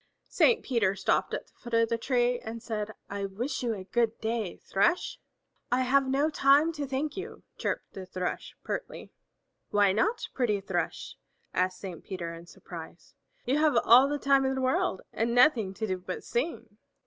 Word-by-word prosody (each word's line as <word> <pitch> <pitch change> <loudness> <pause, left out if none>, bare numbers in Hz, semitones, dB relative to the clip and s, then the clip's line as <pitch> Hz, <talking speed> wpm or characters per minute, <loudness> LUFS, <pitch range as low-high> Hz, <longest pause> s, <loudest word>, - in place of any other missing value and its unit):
Saint 465 -2 +4
Peter 220 -7 +1
stopped 190 - +1
at - - -3
the - - -29
foot 240 -2 -5
of 230 0 +4
the 230 - +1
tree 245 0 +1
and 225 +1 -7
said, 215 -2 -3 0.2
"I 200 0 -3
wish 240 +8 -3
you 235 -3 -1
a 190 - -7
good 230 +3 0
day, 220 -4 -2
Thrush!" 275 - 0 0.5
"I 250 +1 +3
have 265 +1 +3
no 280 +4 +2
time 285 +3 +4
to 295 -3 -4
thank 280 +3 -2
you," 390 +4 -7 0.2
chirped - - -3
the 190 -1 -8
Thrush 185 -1 -4
pertly. - - -5 0.6
"Why 205 -2 +4
not, 225 - 0
pretty 225 -6 +1
Thrush?" 195 - -3 0.4
asked 185 0 +1
Saint 185 -4 -8
Peter 170 -3 -5
in 170 +1 -11
surprise. 170 -1 -11 0.3
"You 270 +4 +2
have 305 -5 +3
all 255 +4 +7
the 290 - 0
time 275 -1 +3
in 265 0 0
the 265 - -2
world 255 -7 0
and 235 +1 0
nothing 245 -6 +5
to 220 - -2
do 185 -3 -2
but 185 0 -6
sing." 240 -5 -3
235 Hz, 185 wpm, -29 LUFS, 195-270 Hz, 0.6 s, all